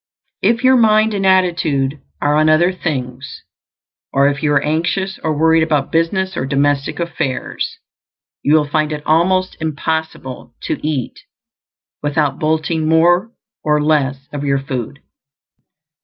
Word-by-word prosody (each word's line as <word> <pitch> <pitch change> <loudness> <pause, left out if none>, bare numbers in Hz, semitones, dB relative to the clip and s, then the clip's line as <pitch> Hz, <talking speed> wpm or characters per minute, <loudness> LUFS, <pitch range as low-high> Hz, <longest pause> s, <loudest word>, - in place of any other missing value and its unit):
If 230 +5 +2
your 260 0 +6
mind 215 -1 +4
and 195 -1 0
attitude 160 -7 +1 0.2
are 145 0 +2
on 155 +1 +3
other 170 +4 +4
things, 130 -6 -5 0.7
or 140 +1 +3
if 140 0 -4
you 150 - +1
are 140 -1 +2
anxious 175 +5 -1
or 155 -2 -1
worried 160 +1 +4
about 150 -3 0
business 190 +3 0
or 130 - -2
domestic 140 +1 0
affairs, 155 -6 -3 0.6
you 150 - +3
will 150 -2 +3
find 155 +1 0
it 150 -1 -5
almost 185 +4 +2
impossible 155 -5 -4
to - - -2
eat 145 -5 -3 0.8
without 145 -1 0
bolting 155 0 0
more 175 +6 +3 0.3
or 150 -1 +2
less 140 -3 0
of 145 -1 -4
your 140 -1 +1
food. 135 0 -5
155 Hz, 140 wpm, -17 LUFS, 140-170 Hz, 0.8 s, your